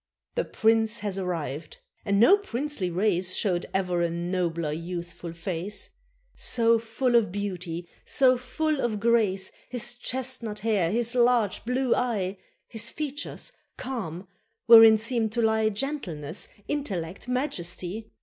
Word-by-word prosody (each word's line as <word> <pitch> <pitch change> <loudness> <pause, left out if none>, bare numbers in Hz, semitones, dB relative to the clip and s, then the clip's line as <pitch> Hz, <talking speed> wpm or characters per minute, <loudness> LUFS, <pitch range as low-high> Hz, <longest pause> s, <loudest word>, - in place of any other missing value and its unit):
The - - -1
Prince 225 0 +2
had 200 -2 -3
arrived, 155 -5 -4 0.3
and 200 -1 +2
no 240 - +8
princely 295 - -3
race 185 0 +1
Showed 180 -4 0
ever 180 -2 0
a 170 - +1
nobler 170 -2 -2
youthful 170 +1 -6
face; 170 +4 -3 0.4
So 230 -1 +3
full 230 +3 -1
of 230 -6 +4
beauty, 180 -4 -4 0.2
so 260 -1 +4
full 275 +4 -1
of 220 -3 -1
grace, 205 -4 +2 0.2
His 240 -1 -2
chestnut 245 -3 -3
hair, 205 -6 +1
his 235 +4 0
large 240 -4 +2
blue 250 +1 +1
eye, 200 -6 -1 0.3
His 225 0 -4
features 295 - -5 0.3
calm, 195 -9 -5 0.4
wherein 225 -2 +9
seem 230 0 0
to 235 +2 -1
lie 220 0 +3
Gentleness, 200 - -3 0.2
intellect, 195 - -3
majesty. 215 - -3
215 Hz, 130 wpm, -27 LUFS, 180-240 Hz, 0.4 s, wherein